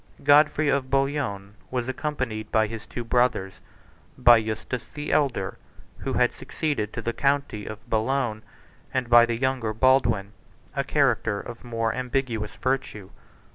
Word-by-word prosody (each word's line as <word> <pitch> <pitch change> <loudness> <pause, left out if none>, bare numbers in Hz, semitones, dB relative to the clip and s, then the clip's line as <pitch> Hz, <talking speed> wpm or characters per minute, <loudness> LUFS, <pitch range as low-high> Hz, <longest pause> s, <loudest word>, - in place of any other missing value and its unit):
Godfrey 150 +1 +5
of 140 -2 +1
Bouillon 135 -8 -1 0.2
45 - - -32
was 125 -1 -2
accompanied 130 -6 -3
by 110 0 +3
his 110 0 -7
two 120 - -5
brothers, 120 -5 +1 0.6
by 120 -1 +7
Eustace 110 +3 -4
the 150 0 -5
elder, 130 -10 0 0.4
who - - -3
had - - +2
succeeded 140 -10 -3
to - - -5
the 115 - -1
county 140 -7 0
of 110 +3 -9
Boulogne, 115 0 0 0.5
and 125 -2 -2
by 120 0 +8
the 120 -1 -1
younger, 130 -3 -1
Baldwin, 115 -5 +3 0.4
a 140 - 0
character 125 -7 +1
of 120 +2 -9
more 115 -2 -1
ambiguous 125 -4 -2
virtue. 130 -7 -3
120 Hz, 145 wpm, -25 LUFS, 110-135 Hz, 0.6 s, by